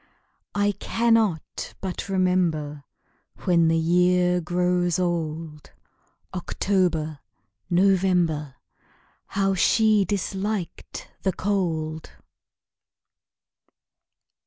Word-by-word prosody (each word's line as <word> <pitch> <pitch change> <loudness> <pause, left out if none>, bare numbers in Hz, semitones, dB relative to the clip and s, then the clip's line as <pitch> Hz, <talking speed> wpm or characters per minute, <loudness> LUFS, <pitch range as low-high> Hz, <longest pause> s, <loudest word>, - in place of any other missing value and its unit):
I 205 0 +2
cannot 225 -9 0
but 190 +1 -5
remember 170 -6 0 0.6
When 170 -3 +3
the 165 0 +3
year 180 +2 +3
grows 175 0 +1
old 160 -3 -3 0.6
October 175 -5 -1 0.5
November 175 -6 +2 0.7
How 195 0 0
she 215 +2 +4
disliked 200 0 -3
the 190 - 0
cold! 165 -5 -2
180 Hz, 65 wpm, -24 LUFS, 160-195 Hz, 0.7 s, she